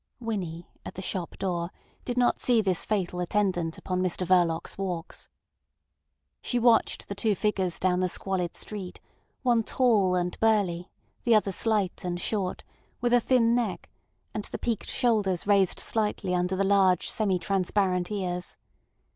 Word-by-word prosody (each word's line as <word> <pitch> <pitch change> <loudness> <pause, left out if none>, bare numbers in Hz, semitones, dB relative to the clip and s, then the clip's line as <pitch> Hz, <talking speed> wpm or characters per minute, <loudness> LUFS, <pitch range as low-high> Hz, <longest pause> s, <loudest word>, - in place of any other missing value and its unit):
Winnie, 185 -8 -4 0.2
at - - -8
the 190 - -5
shop 180 -2 -3
door, 175 -3 -2 0.4
did 245 0 -3
not 245 -1 +3
see 245 -2 +3
this 190 -5 +1
fatal 185 -4 -1
attendant 180 -3 0
upon 185 -1 -2
Mr 185 0 -1
Verloc's 170 -2 +2
walks. 180 -4 -5 1.1
She 245 - -1
watched 235 -1 +3
the - - -4
two 205 +1 +1
figures 190 -4 0
down 180 -1 +1
the 185 0 +1
squalid 180 -2 -2
street, 195 -4 -6 0.4
one 240 -3 +3
tall 215 -6 +2
and 180 0 -2
burly, 195 -6 +1 0.3
the 235 -2 +4
other 205 -2 +2
slight 205 -2 0
and 175 -1 -2
short, 190 -1 -2 0.4
with 240 0 +1
a 245 - +7
thin 235 -1 +3
neck, 240 -2 -2 0.4
and 210 - -4
the - - -6
peaked 230 -3 -2
shoulders 210 -8 +1
raised 200 -3 +3
slightly 210 -4 -1
under 180 +1 0
the 195 - +1
large 195 -3 +3
semi 200 -4 +1
transparent 185 -1 0
ears. 180 -3 -3
195 Hz, 155 wpm, -27 LUFS, 180-220 Hz, 1.1 s, a